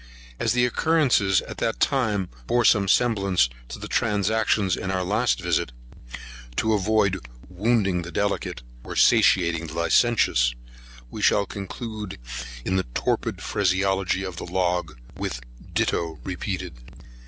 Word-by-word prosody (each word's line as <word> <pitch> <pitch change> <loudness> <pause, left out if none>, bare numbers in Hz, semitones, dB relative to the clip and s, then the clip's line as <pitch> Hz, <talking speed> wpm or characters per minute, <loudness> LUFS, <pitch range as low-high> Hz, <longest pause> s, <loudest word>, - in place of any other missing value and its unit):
As - - +1
the 125 0 +3
occurrences 125 - +2
at - - -9
this - - 0
time 105 -9 0 0.2
bore 120 -1 +2
some 100 -1 +4
semblance 100 - +2 0.2
to - - -7
the - - -7
transactions 105 -1 +1
in 95 - -5
our 95 -1 0
last 110 +6 +1
visit, 85 -7 0 0.8
to 110 - +1
avoid 100 -2 +1 0.3
wounding 100 -1 +1
the 85 +1 -7
delicate, 100 -11 -2 0.2
or - - -7
satiating 85 -7 +4
the 80 - -9
licentious, 85 - +3 0.6
we - - -6
shall 100 - +3
conclude 105 +1 -6 0.5
in 95 - +1
the 95 - -1
torpid - - -1
phraseology 95 -1 +1
of 95 -3 -6
the - - -5
log, 90 -5 -1 0.2
with 60 - -3 0.3
ditto 80 -2 -1
repeated. 90 -4 -4
95 Hz, 130 wpm, -24 LUFS, 90-110 Hz, 0.8 s, some